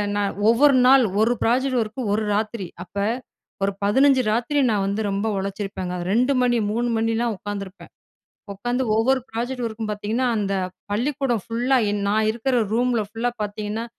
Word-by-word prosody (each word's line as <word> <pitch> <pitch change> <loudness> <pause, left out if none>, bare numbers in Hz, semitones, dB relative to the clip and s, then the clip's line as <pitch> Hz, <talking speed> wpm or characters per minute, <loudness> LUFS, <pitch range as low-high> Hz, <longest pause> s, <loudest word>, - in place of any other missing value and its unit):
நான் 205 -1 -1
ஒவ்வொரு 275 +4 +5
நாள் 270 0 +7 0.2
ஒரு 230 +2 +3
ப்ராஜெக்ட் 255 +2 +2
ஒர்க்கு 215 +4 -7
ஒரு 215 +1 0
ராத்திரி. 215 -3 -2 0.2
அப்ப 175 - -43 0.7
ஒரு 200 - +2
15 265 +6 +4
ராத்திரி 245 +6 0
நான் 200 -2 +1
வந்து 200 +2 -1
ரொம்ப 200 +3 -1
உழைச்சிருப்பேங்க. 195 -2 -4 0.2
2 250 +5 +3
மணி, 245 -1 +2
3 240 +2 0
மணிலாம் 225 +1 0
உட்காந்துருப்பேன். 200 -1 -7 0.6
உட்காந்து 245 +6 -2
ஒவ்வொரு 260 +4 +2
ப்ராஜெக்ட் 245 +3 -3
இருக்கும் 220 -1 -4
பாத்தீங்கன்னா, 215 +5 -1
அந்த 195 -2 -1 0.4
பள்ளிக்கூடம் 245 0 -1
ஃபுல்லா 245 +4 +1
என் 205 0 -2
நான் 215 +1 +2
இருக்குற 245 +3 -1 0.2
ரூம்ல 245 0 +1
ஃபுல்லா 230 +3 -2
பாத்தீங்கன்னா? 210 +2 -4
225 Hz, 150 wpm, -23 LUFS, 205-245 Hz, 0.7 s, நாள்